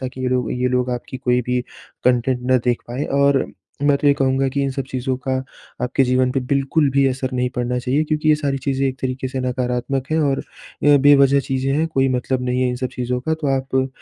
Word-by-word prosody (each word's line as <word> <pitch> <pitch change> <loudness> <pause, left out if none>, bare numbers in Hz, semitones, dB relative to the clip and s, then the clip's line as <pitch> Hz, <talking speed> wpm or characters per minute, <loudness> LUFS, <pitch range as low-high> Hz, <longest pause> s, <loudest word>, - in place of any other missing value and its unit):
ताकि 130 0 -6
ये 130 - 0
लोग 125 -1 0
ये 125 0 0
लोग 125 0 0
आपकी 125 +1 -5
कोई 125 -1 +1
भी 125 0 +1 0.4
कंटेंट 125 0 +2
ना 130 - +6
देख 120 -1 0
पाएँ 125 +5 -3 0.2
और 140 -1 +3 0.4
मैं 145 -1 +4
तो - - -1
ये 145 - +7
कहूँगा 135 0 +1
कि 140 +1 -1
इन 135 - 0
सब 135 0 -3
चीज़ों 130 0 -2
का 130 +1 -4 0.5
आपके 125 +2 +1
जीवन 125 0 +2
पे 135 - 0
बिल्कुल 140 +2 +2
भी 135 0 +3
असर 130 0 -3
नहीं 125 0 0
पड़ना 125 0 -1
चाहिए 130 +4 0
क्योंकि 155 0 -1
ये 155 - +6
सारी 140 -2 -2
चीज़ें 135 0 -1
एक 130 - -4
तरीके 130 0 -3
से 130 0 -4
नकारात्मक 125 +2 -2
है 160 - +1
और 135 -2 0 0.4
ये 145 0 +6
बेवजह 140 -1 +6
चीज़ें 135 0 -1
हैं 155 +3 +1
कोई 135 -4 +1
मतलब 130 0 -1
नहीं 125 0 -1
है 125 - +2
इन 125 - -2
सब 130 0 -3
चीज़ों 125 0 -2
का 160 +5 -1
तो 150 - -2
आप 130 0 -1
130 Hz, 235 wpm, -20 LUFS, 125-140 Hz, 0.5 s, ये